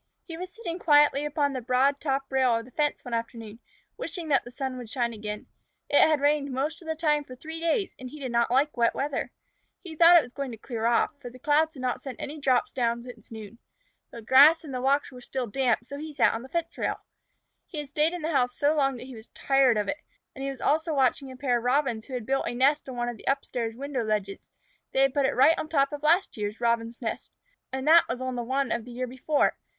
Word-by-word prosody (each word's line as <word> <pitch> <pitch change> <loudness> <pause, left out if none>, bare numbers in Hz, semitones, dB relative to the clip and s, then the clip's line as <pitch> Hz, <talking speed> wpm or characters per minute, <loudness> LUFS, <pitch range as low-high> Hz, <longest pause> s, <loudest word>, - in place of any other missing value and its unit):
He 330 - -8
was 365 +2 -6
sitting 360 -5 -6
quietly 295 -3 +4
upon 290 -1 0
the 255 - -3
broad 260 +4 +2
top 275 -2 0
rail 260 -3 +3
of 230 0 -3
the 255 - -16
fence 295 +2 -1
one 245 - -6
afternoon, 230 -1 -5 0.4
wishing 350 -9 -5
that 275 -3 +3
the - - -10
sun 255 0 -5
would 240 -3 -9
shine 235 0 -1
again. 210 -1 -6 0.5
It 290 - +5
had 310 -2 +5
rained 285 0 +1
most 290 +6 -2
of 330 - -13
the 320 - -1
time 300 -2 +1
for 255 -2 -11
three 320 +5 -7
days, 335 +4 0
and 255 -1 -7
he 300 - -11
did 260 -3 -4
not 235 0 +2
like 275 +5 +2
wet 235 -1 +2
weather. 285 +1 -2 0.5
He 335 -4 -8
thought 340 +2 +8
it 325 - +5
was 245 - -11
going 275 -2 -4
to - - -8
clear 225 0 -3
off, 235 - +2
for 245 - -7
the 250 - -14
clouds 305 +4 +2
had 260 - -9
not 250 -1 -1
sent 265 -4 -8
any 300 +2 -6
drops 260 -3 +1
down 235 -1 -1
since 240 -3 -13
noon. 220 0 -10 0.5
The 235 - -10
grass 290 +8 +7
and 290 -4 -8
walks 275 +3 +1
were 250 -1 -11
still 255 0 -3
damp, 240 0 0
so 280 +3 -8
he 310 0 -7
sat - - +3
on 225 - -4
the 260 - -11
fence 335 +2 -3
rail. - - -2 0.7
He 330 - -9
had 295 -2 -5
stayed 305 +3 +1
in 350 -3 -5
the 320 - -1
house 250 -4 +1
so 290 +2 +2
long 270 -3 +1
that 245 - -9
he 260 - -10
was 220 -1 -12
tired 270 -4 +3
of 210 - -1
it, 290 - -2 0.4
and 270 - -7
he 275 - -2
was 270 -3 -7
also 315 +1 +1
watching 270 0 +1
a 260 - -11
pair 250 -3 +1
of - - -10
Robins 245 -3 0
who 260 - -6
had 240 -3 -4
built 270 +2 0
a 240 - -3
nest 275 +3 +2
on 255 - -6
one 240 0 -2
of 240 - -6
the - - -15
up 275 0 +1
stairs 230 -2 -3
window 270 -1 -3
ledges. 210 -2 -3 0.4
They 265 - +3
had 270 -1 +3
put 285 -2 +2
it - - -2
right 275 +6 +6
on 310 - -4
top 275 -3 +2
of 290 - -5
a - - -5
last 345 -1 +2
year's 210 0 -4
Robins' 235 0 -1
nest, 225 - -4 0.4
and 265 +2 -4
that 330 +2 +7
was 250 - -3
on 255 -1 -3
one 265 -1 0
of 235 - -1
the 245 - -10
year 250 +1 -3
before. 260 +4 0
265 Hz, 260 wpm, -27 LUFS, 240-295 Hz, 0.7 s, thought